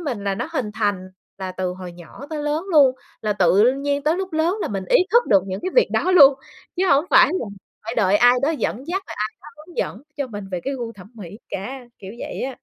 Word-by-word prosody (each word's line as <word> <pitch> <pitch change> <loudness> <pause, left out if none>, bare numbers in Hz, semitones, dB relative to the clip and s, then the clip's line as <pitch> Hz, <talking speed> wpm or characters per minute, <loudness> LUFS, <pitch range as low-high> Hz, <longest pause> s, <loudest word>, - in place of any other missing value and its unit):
mình 245 - -4
là 195 -1 0
nó 250 - -4
hình 225 -9 -2
thành 205 -4 -1 0.3
là 185 -1 -5
từ 185 -1 -3
hồi 180 -1 -9
nhỏ 175 - -12
tới 300 -1 -4
lớn 300 +4 -1
luôn, 275 -4 +6 0.3
là 210 -1 0
tự 200 +6 +4
nhiên 280 +1 -2
tới 310 +4 +1
lúc 380 -2 -4
lớn 325 +5 +1
là - - -2
mình 195 -2 -4
ý - - +6 0.2
thức 475 +1 +5
được 195 -3 +4
những 190 +1 -4
cái 375 - -3
việc - - +5
đó 370 - +1
luôn, 280 -6 +8 0.4
chứ 375 - +1
hông 280 +3 +4
phải 345 +1 +7
là 370 -11 -2 0.4
phải 225 +2 -4
đợi 205 -2 +3
ai 245 +2 +6
đó 285 - +2
dẫn 280 -4 -3
dắt, 380 +3 -2
rồi - - -7
ai 215 0 0
đó 300 - -12
hướng 315 +3 -15
dẫn 225 - -3
cho 280 -2 -2
mình 205 -4 -7
về 175 - -2
cái 275 +1 -2
gu 235 -3 -5
thẩm 200 +1 -15
mỹ 205 -1 -10
cả, 255 +8 -5 0.2
kiểu 195 +1 -9
vậy - - -6
á. 260 0 -4
245 Hz, 255 wpm, -21 LUFS, 200-300 Hz, 0.4 s, luôn